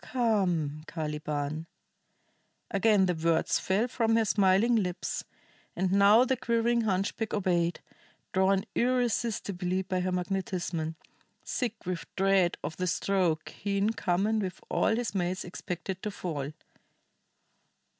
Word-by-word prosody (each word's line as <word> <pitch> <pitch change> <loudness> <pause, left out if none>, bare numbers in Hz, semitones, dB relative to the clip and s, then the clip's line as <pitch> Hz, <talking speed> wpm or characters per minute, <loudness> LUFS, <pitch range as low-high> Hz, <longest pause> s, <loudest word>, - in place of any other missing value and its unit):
"Come, 185 - 0
Caliban!" 150 0 -3 1.0
Again 205 -1 +4
the 180 - +1
words 165 0 +1
fell 200 +6 +1
from 225 -2 +1
her 225 -1 +3
smiling 200 +3 +4
lips, 180 -4 -2 0.5
and 185 +1 0
now 200 +5 +6
the 260 - +1
quivering 235 0 +1
hunchback 205 +1 -1
obeyed, 175 -4 +1 0.5
drawn 190 +1 +3
irresistibly 220 -7 0
by 185 0 -1
her 185 0 -1
magnetism, 180 -3 -2 0.5
sick 240 -4 -2
with 180 -2 -3
dread 195 -2 +3
of 155 +2 -4
the 185 - -1
stroke 175 -2 0
he 200 0 -3
in 205 +3 +2
common 205 +2 +1
with 185 -3 -4
all 220 - +2
his 235 -2 -2
mates 185 -1 -1
expected 180 +1 -5
to 210 - -2
fall. 155 -8 -4
190 Hz, 125 wpm, -29 LUFS, 175-215 Hz, 1.0 s, now